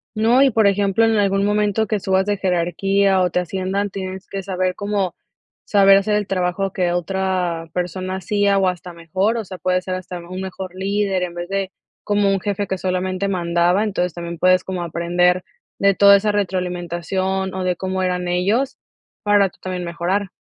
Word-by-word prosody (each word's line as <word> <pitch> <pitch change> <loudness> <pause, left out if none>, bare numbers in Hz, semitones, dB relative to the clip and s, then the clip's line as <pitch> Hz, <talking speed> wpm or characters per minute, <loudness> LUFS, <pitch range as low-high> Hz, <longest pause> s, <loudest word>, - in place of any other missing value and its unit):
No, 230 +4 +4
y 275 - +6
por 220 -2 +4
ejemplo, 200 +2 +2
en 225 0 +2
algún 200 -1 +2
momento 210 +1 +1
que 215 -3 -1
subas 190 0 +1
de 205 0 0
jerarquía, 190 +1 +1
o 180 - +2
te 180 - 0
asciendan, 190 +3 -2
tienes 190 0 -6
que 195 -1 -5
saber 185 -1 -1
cómo 200 -3 -2 0.5
saber 195 -1 +6
hacer 210 +2 +1
el 210 -1 -1
trabajo 190 +1 -1
que 180 -2 0
otra 175 -2 -1
persona 185 +1 -3
hacía, 200 +1 +1
o, 190 -1 +3
hasta 180 -1 -3
mejor, 185 +7 -1
o 220 - -3
sea, 185 0 -8
puede 180 +2 0
ser 185 0 -4
hasta 185 -1 -6
un 180 +2 -7
mejor 190 -1 -6
líder, 195 -1 0
en 175 -1 -4
vez 175 0 -5
de 195 0 -2 0.3
como 205 -1 +2
un 195 -1 +1
jefe 205 0 -2
que 190 - -2
solamente 185 +1 -1
mandaba, 175 +1 +1
entonces, 180 -4 -1
también 170 -1 -6
puedes 185 +1 +3
como 185 -2 -3
aprender 175 +2 +1 0.3
de 200 -1 +3
toda 200 0 +7
esa 210 +1 0
retroalimentación, 185 0 -2
o 190 0 -3
de 180 -1 0
cómo 190 0 -2
eran 180 -1 -1
ellos 200 +10 0 0.5
para 205 -1 +4
tú - - -27
también 185 -1 -4
mejorar. 175 +3 -2
190 Hz, 190 wpm, -20 LUFS, 180-200 Hz, 0.5 s, toda